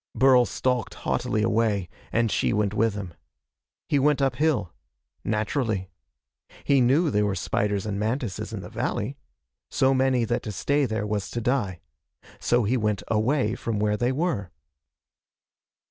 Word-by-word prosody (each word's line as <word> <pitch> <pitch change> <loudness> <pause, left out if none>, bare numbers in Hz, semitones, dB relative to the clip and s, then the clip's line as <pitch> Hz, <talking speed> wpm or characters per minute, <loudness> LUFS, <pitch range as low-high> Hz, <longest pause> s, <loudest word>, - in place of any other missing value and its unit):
Burl 130 -2 +5
stalked 125 -4 -1
haughtily 110 - -1
away, 110 -4 +1 0.2
and 115 -2 +1
she - - +1
went 105 -1 +1
with 110 -1 +1
him. 95 -4 -6 0.7
He 145 - +2
went 145 +1 +3
uphill. 135 - +1 0.5
Naturally. 110 -2 -1 0.7
He 140 -2 +3
knew 140 +6 +3
there 105 -1 +2
were 100 - -1
spiders 100 -1 -1
and 100 -2 -2
mantises 110 -2 -2
in - - -5
the - - -9
valley. 130 +7 -3 0.5
So 135 0 +3
many 130 -2 +2
that 120 +1 -1
to 110 - -5
stay 140 +8 +1
there 110 -2 -2
was 105 -1 -2
to 120 - -3
die. 110 -7 -1 0.6
So 120 0 +2
he 120 +5 +1
went 105 -3 -1
away 110 +1 +1
from 115 -2 -3
where 105 0 +1
they 120 +3 +1
were. 135 - -1
115 Hz, 150 wpm, -25 LUFS, 105-130 Hz, 0.7 s, Burl